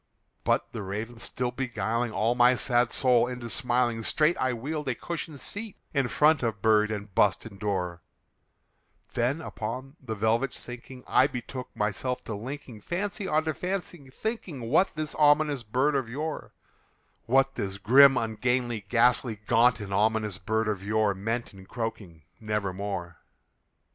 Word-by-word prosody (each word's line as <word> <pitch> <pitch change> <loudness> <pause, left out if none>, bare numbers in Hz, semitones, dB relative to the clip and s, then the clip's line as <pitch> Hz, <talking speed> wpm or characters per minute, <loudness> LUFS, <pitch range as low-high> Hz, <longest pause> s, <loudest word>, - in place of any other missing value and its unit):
'" - - -45
But - - +1
the - - -5
Raven 105 +5 -5
still 125 +1 -3
beguiling 120 -2 -1
all 110 +2 +1
my 125 +1 +5
sad 120 -1 +2
soul 125 -3 +3
into 125 -2 -5
smiling, 120 -2 +1
Straight 155 +8 +2
I 130 - +1
wheeled 140 +4 -3
a 125 - 0
cushioned 165 -2 -5
seat 205 +5 -6 0.2
in 135 -4 +2
front 150 +4 +4
of 115 -4 -1
bird 105 +1 +4
and 105 -2 -5
bust 105 +4 +3
and 100 -4 -10
door; 90 -5 -2 1.1
Then, 125 +7 0
upon 130 +4 -6
the 110 -4 -4
velvet 115 +5 +1
sinking, 125 +1 -9
I 130 - +4
betook 125 0 -6
myself 125 +5 -2
to 110 - -5
linking 120 +1 -7
Fancy 195 - -3
unto 155 0 +1
fancy, 175 -5 -4
thinking 185 - -4
what 180 +4 +3
this 155 0 -3
ominous 145 -2 +4
bird 130 +7 +1
of 135 -4 -1
yore 150 +5 -5 0.7
What 135 +2 +3
this 100 -6 -3
grim, 135 +6 +7
ungainly, 115 -1 -1
ghastly, 120 -1 +3
gaunt, 120 -1 +4
and 100 -1 -5
ominous 105 -1 +1
bird 110 +3 0
of 105 -3 -1
yore 105 0 +2
Meant 115 +5 -3
in 95 -1 -13
croaking 105 -9 -5 0.2
"Nevermore." 100 -4 -3
120 Hz, 155 wpm, -28 LUFS, 110-135 Hz, 1.1 s, grim